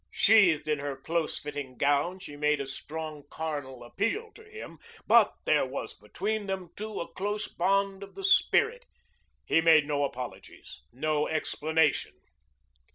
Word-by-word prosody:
Sheathed 180 -9 +4
in 150 -1 0
her 140 -1 -3
close 165 +3 -1
fitting 145 -4 -6
gown, 145 +6 +1
she 150 -6 -10
made 150 0 +1
a 140 - -3
strong 155 +2 -6
carnal 145 -6 -5
appeal 225 - -2
to 445 - -15
him, 435 0 -10 0.3
but - - +6
there - - +3
was - - -5
between 215 -1 -4
them, 190 -3 -4
too, 215 0 -5
a 170 - -5
close 205 +2 -2
bond 195 +2 0
of 200 0 -10
the 390 - -8
spirit. 465 +5 +3 0.6
He 165 - +3
made 160 -2 +6
no 145 -1 0
apologies, 125 - -7
no 150 +3 0
explanation. 160 -1 0
160 Hz, 150 wpm, -29 LUFS, 145-200 Hz, 0.6 s, but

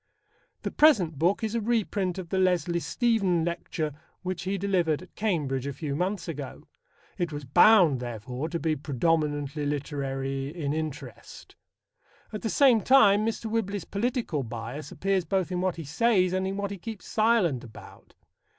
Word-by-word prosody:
The - - -2
present 190 - +4
book 190 +7 +2
is 220 0 -1
a 230 - 0
reprint 205 -5 0
of 180 -3 -6
the 190 - 0
Leslie 175 -2 +2
Stephen 195 -6 +1
lecture 170 -3 -3 0.3
which 185 0 -4
he 195 +1 -1
delivered 180 -5 0
at 185 - -17
Cambridge 145 - -1
a 140 - -3
few 145 -1 -4
months 185 +5 -2
ago. 145 -5 -7 0.5
It 175 -2 -1
was 145 -1 -6
bound, 175 - +6
therefore, 125 +5 -5
to 170 - -2
be 160 -1 0
predominantly 145 0 -1
literary 135 -2 -3
in 150 -3 -3
interest. 150 -6 -7 0.8
At 210 - -4
the 225 - -2
same 255 -5 +5
time, 215 -6 +5
Mr. 225 0 -3
Whibley's 205 -4 -2
political 225 - -1
bias 120 +4 -6
appears 195 -1 0
both 190 0 -1
in 180 0 -1
what 185 -2 0
he 165 - -6
says 185 - +2
and 190 0 0
in 195 +1 -3
what 200 0 -2
he 200 - -6
keeps 220 0 -8
silent 215 - +2
about. 115 -3 -14
175 Hz, 165 wpm, -27 LUFS, 145-200 Hz, 0.8 s, bound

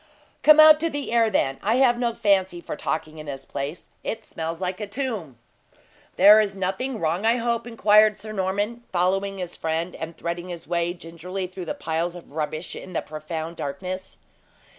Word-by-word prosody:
"Come 305 0 +7
out 310 0 +9
to 330 +1 0
the 290 -4 -4
air, 230 -1 +4
then. 135 -9 0
I 215 +4 +2
have 250 -2 +4
no 235 -2 0
fancy 190 -5 +2
for 170 - -6
talking 155 +1 -3
in 155 - -9
this 135 -1 -6
place; 145 +5 -5
it 225 0 -4
smells 165 +1 -5
like 185 +1 -3
a 210 - -4
tomb." 205 - -4 0.8
"There 205 +3 +8
is 200 -2 -2
nothing 195 +7 -2
wrong, 170 +3 0
I 225 +1 +4
hope?" 235 0 -1
inquired 215 -2 +5
Sir 215 +2 -8
Norman, 205 +4 -1
following 195 +2 +1
his 180 -2 -5
friend, 165 +2 -2
and 165 +1 -7
threading 175 +1 -4
his 170 -1 -7
way 175 0 0
gingerly 175 +3 -6
through 185 0 -7
the - - -3
piles 165 +2 -2
of 175 - -12
rubbish 155 +2 -4
in 185 - -9
the - - -1
profound 160 +2 -6
darkness. 185 +7 -5
185 Hz, 185 wpm, -24 LUFS, 165-215 Hz, 0.8 s, out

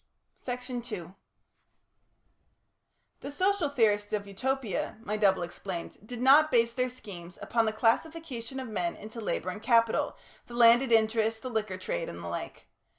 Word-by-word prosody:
Section 250 0 -4
2 195 -7 -7 2.1
The - - -6
social 370 +2 +1
theorists 210 -6 +2
of 205 -1 -1
Utopia, 230 +2 -2
my 210 - -2
double 195 -4 +3
explained, 175 0 -6
did 245 0 -6
not 295 +4 +7
base 230 -3 +3
their 255 +1 0
schemes 180 -8 -10
upon 230 -1 +1
the - - +2
classification 260 +2 -1
of 260 - -5
men 340 +10 -2
into 220 +2 -9
labour 185 -4 -2
and 210 - -8
capital, 230 -1 +2 0.3
the 240 - -9
landed 240 +2 +6
interest, 220 0 +2
the 255 - -4
liquor 215 -4 -2
trade, - - -3
and - - -8
the - - -5
like. - - -6
230 Hz, 150 wpm, -29 LUFS, 210-260 Hz, 2.1 s, not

